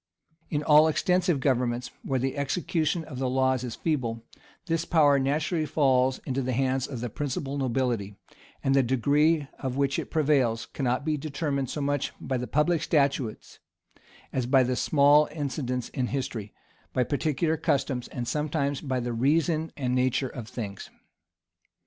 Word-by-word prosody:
In 150 -1 -1
all 150 +1 +6
extensive 180 0 +1
governments, 125 -2 0
where 135 - -1
the 130 +1 -1
execution 155 +3 -1
of 135 -5 -8
the 130 -1 0
laws 130 -1 +1
is 120 -2 -5
feeble, 120 -8 -2 0.4
this 165 -2 0
power 145 -4 +4
naturally 155 +4 0
falls 130 -3 +2
into 135 0 -1
the 130 0 -2
hands 130 +1 0
of 130 -5 -6
the 120 - -3
principal 140 +1 -3
nobility; 120 -6 -1 0.5
and 135 - +2
the 135 - +5
degree 145 +5 +2
of 130 -2 -3
it - - -6
which 140 -1 +1
prevails, 135 -7 +2
cannot 130 +1 -2
be 155 -1 0
determined 140 -2 -2
so 150 - -3
much 145 -1 -1
by 130 - -2
the 125 0 -4
public 150 +2 +2
statutes, 140 -7 0 0.7
as 130 -2 -1
by 130 0 +5
small 145 +3 +4
incidents 130 -5 -3
in 125 -1 -2
history, 120 -6 -4 0.4
by 125 - +2
particular 155 +4 0
customs, 135 -5 -1
and 120 -1 -5
sometimes 145 -1 -1
by 130 -3 -1
the 120 0 -3
reason 155 +6 +1
and 125 -3 -1
nature 130 +1 +1
of 120 -4 -8
things. 100 -5 -6
135 Hz, 155 wpm, -27 LUFS, 125-150 Hz, 0.7 s, all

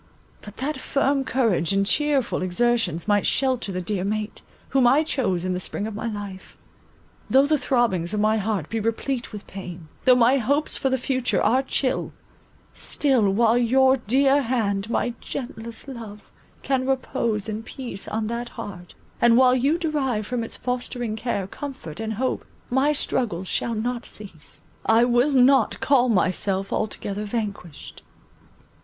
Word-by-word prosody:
But 210 - -12
that 295 +4 -2
my - - -9
firm 275 0 +1
courage 220 -11 +1
and 195 0 +2
cheerful 280 0 +1
exertions 215 -1 0
might 205 -1 +3
shelter 255 -6 +1
the 185 -1 -3
dear 185 0 -2
mate, 210 +1 -3 0.3
whom 265 -3 +4
I 280 +5 +5
chose 195 - -1
in 185 - 0
the 180 - -2
spring 200 +2 -2
of 220 - -5
my 220 +3 -4
life; 205 -3 -7 0.7
though 270 +1 +5
the 305 +2 +3
throbbings 235 - +1
of 210 - -1
my 215 +1 +3
heart 205 -6 -1
be 225 - -2
replete 235 +3 -2
with 210 -2 -8
pain, 180 -4 -9 0.2
though 255 - +7
my 250 +2 +4
hopes 285 +6 0
for 270 - 0
the 260 - +1
future 255 -1 0
are 245 +5 +3
chill, 270 -1 -1 0.6
still 260 -8 +2
while 230 +4 +3
your 260 +2 +4
dear 270 +4 +3
head, 220 -5 -1
my 240 0 0
gentlest 235 -2 -7
love, 225 -6 -9 0.3
can 265 -1 0
repose 245 -5 -1
in 215 0 -3
peace 240 -3 -5
on 220 0 -2
that 235 +2 -3
heart, 185 -6 -8 0.3
and 235 0 +6
while 255 -1 +6
you 275 +6 +2
derive 275 - -1
from 240 +1 -2
its 225 - -6
fostering 245 -2 -3
care, 220 -3 -2
comfort, 225 - -8
and 220 0 -3
hope, 255 +4 -1 0.3
my 265 +4 +3
struggles 210 - -1
shall 230 +5 -1
not 240 +2 -3
cease,—I 210 +4 -2
will 245 +4 +3
not 260 -3 +4
call 255 -3 +3
myself 190 -1 +1
altogether 210 -1 -3
vanquished. 200 -7 -5
235 Hz, 160 wpm, -24 LUFS, 205-260 Hz, 0.7 s, though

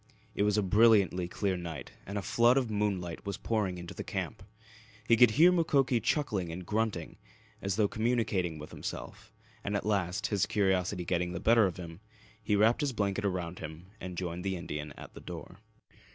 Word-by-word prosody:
It - - -2
was 105 0 +3
a 105 - +3
brilliantly 100 -3 +4
clear 95 +1 -1
night 85 -4 -6 0.2
and 100 +2 -4
a 100 - -2
flood 120 +5 +4
of 125 -5 0
moonlight 100 -5 -1
was 100 -1 -4
pouring 105 -5 -1
into 85 -1 -7
the - - -6
camp. - - -4 0.7
He 115 - +6
could 120 +1 +7
hear 170 +4 +8
Mukoki 140 -8 +2
chuckling 105 - 0
and 90 +2 -6
grunting, 105 -5 -2 0.4
as 100 -1 -1
though 105 -1 +3
communicating 110 -7 0
with 75 0 -9
himself, - - -7 0.3
and 100 - -2
at 100 - -1
last, 95 -4 0
his 100 -4 +1
curiosity 95 -2 +1
getting 90 0 0
the 85 - -3
better 110 +1 +5
of 90 - -5
him, 85 -1 -8 0.4
he 105 -1 +1
wrapped 110 +7 +4
his 145 -3 0
blanket 100 -2 -1
about 90 -3 -2
him 80 +4 -9
and 90 -1 -7
joined 90 0 -3
the 95 -1 -1
Indian 75 -4 -5
at - - -11
the - - -11
door. - - -9
100 Hz, 190 wpm, -31 LUFS, 90-110 Hz, 0.7 s, hear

